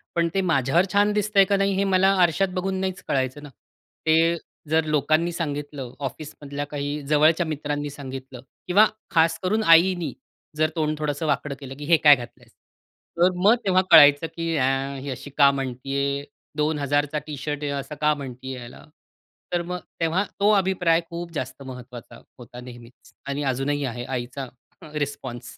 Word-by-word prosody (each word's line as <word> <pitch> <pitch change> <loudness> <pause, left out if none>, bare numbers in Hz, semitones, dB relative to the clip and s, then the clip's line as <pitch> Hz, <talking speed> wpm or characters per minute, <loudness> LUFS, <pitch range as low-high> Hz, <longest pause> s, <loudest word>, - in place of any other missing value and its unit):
पण 170 0 +2
ते 195 - +1
माझ्यावर 165 0 +2
छान 205 +1 +4
दिसतंय 205 -1 +3
का 200 +1 +1
नाही 195 0 +1
हे 195 - +1
मला 190 -1 +3
आरशात 175 +3 +3
बघून 190 +1 -2
नाहीच 190 -1 -3
कळायचं 130 +2 -1
ना. 145 - -9 0.6
ते 165 +1 +4 0.3
जर 160 +1 +2
लोकांनी 155 +3 +1
सांगितलं, 145 -5 -5
ऑफिसमधल्या 145 +1 -6
काही 145 0 -3
जवळच्या 155 +3 +4
मित्रांनी 145 -1 -3
सांगितलं 135 -2 -8 0.3
किंवा 200 +4 +6 0.3
खास 165 0 +3
करून 215 +4 +1
आईनी 170 -3 +3 0.4
जर 155 0 +2
तोंड 155 -2 -1
थोडंसं 150 +1 -2
वाकडं 145 -1 -1
केलं, 135 -2 -8
की 145 - -6
"हे 165 +2 +5
काय 150 -2 +7
घातलंय." 120 -2 -11 0.7
तर 180 +2 +5
मग 215 +4 +6
तेव्हा 185 -1 +4
कळायचं 145 +2 +8
की 165 0 -3
ए, 135 0 0
ही 140 - -6
अशी 130 +2 -7
का 140 -2 +7
म्हणतीये. 140 +1 -3 0.3
2,000चा 145 -1 0
टी-शर्ट 150 0 -4
आहे 145 - -2
असं 140 +1 -5
का 150 0 +4
म्हणतीये 130 -2 -7
याला. 120 0 -11 0.7
तर 175 - +1
मग 180 +1 -5 0.2
तेव्हा 165 +4 +1 0.2
तो 205 +1 +4
अभिप्राय 185 -4 +2
खूप 170 0 -6
जास्त 135 -2 -5
महत्त्वाचा 125 -2 -10 0.2
होता 120 0 -11
नेहमीच. 120 0 -14
आणि 140 +1 -3
अजूनही 145 +3 -1
आहे 120 -1 -5
आईचा 130 +1 -4 0.4
र 155 - -12
रिस्पॉन्स. 135 -4 -5
150 Hz, 160 wpm, -24 LUFS, 135-170 Hz, 0.7 s, कळायचं